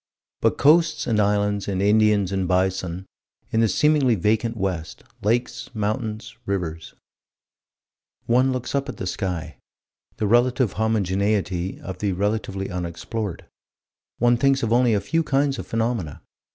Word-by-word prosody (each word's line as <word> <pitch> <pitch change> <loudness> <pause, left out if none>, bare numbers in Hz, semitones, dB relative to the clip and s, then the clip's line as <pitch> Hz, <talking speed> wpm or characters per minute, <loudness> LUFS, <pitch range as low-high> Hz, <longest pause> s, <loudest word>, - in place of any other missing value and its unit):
But - - +2
coasts 155 +2 +4
and 110 -3 +1
islands 105 0 +1
and 95 -2 -1
Indians 105 -1 +3
and 95 -2 -1
bison, 95 0 0 0.5
in 110 - +1
the 115 - +4
seemingly 145 -1 +3
vacant 110 +4 0
west: 90 -5 -3 0.2
lakes, 120 +4 -1
mountains, 110 +1 -3
rivers 85 -5 -3 1.3
One 125 +3 +3
looks 130 -1 -4
up 140 0 -1
at - - -6
the - - -4
sky: 85 -7 -4 0.6
the 110 - -1
relative 120 +1 +3
homogeneity 100 -3 0
of 95 -1 -7
the 100 -2 0
relatively 100 0 -2
unexplored: 90 +3 -4 0.7
one 120 0 +3
thinks 135 +1 +2
of 115 0 +1
only 120 -2 +4
a 100 - 0
few 165 0 0
kinds 140 -2 0
of - - -6
phenomena. 115 -9 -2
105 Hz, 140 wpm, -23 LUFS, 95-120 Hz, 1.3 s, coasts